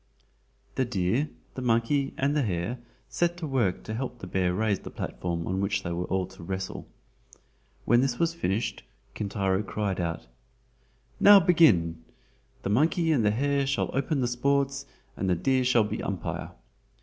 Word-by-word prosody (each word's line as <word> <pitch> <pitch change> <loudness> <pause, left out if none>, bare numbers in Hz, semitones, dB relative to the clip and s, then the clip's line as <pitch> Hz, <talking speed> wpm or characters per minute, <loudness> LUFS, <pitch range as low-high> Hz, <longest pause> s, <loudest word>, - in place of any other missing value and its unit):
The 130 - +2
deer, 115 +6 0 0.2
the 130 - -6
monkey 125 +4 +1
and 140 +2 +1
the 150 - +3
hare 105 +2 -2 0.3
set 175 0 0
to 175 - -4
work 120 -10 0
to 110 - -5
help 125 +1 -4
the 115 - -8
bear 90 0 0
raise 105 +1 0
the - - -9
platform 85 -1 -4
on 95 +1 -1
which 100 -1 0
they 85 - -3
were 85 +1 -2
all 95 0 -1
to 95 +1 -14
wrestle. 95 +2 -5 1.0
When 120 +2 +4
this 130 -2 0
was 170 0 +1
finished, 110 - -2 0.3
Kintaro 100 -2 -1
cried 100 -2 -2
out: 85 -2 -3 0.9
"Now 205 0 +9
begin! 100 - +4 0.6
the - - -2
monkey 160 - +2
and 135 -7 +3
the 105 - +4
hare 140 +5 +1
shall - - 0
open 140 +1 0
the 125 - +1
sports 140 +3 0 0.3
and 95 - -2
the 90 - +3
deer 130 +8 +1
shall 125 -3 +4
be 105 - -3
umpire. - - -4
115 Hz, 170 wpm, -27 LUFS, 95-140 Hz, 1.0 s, Now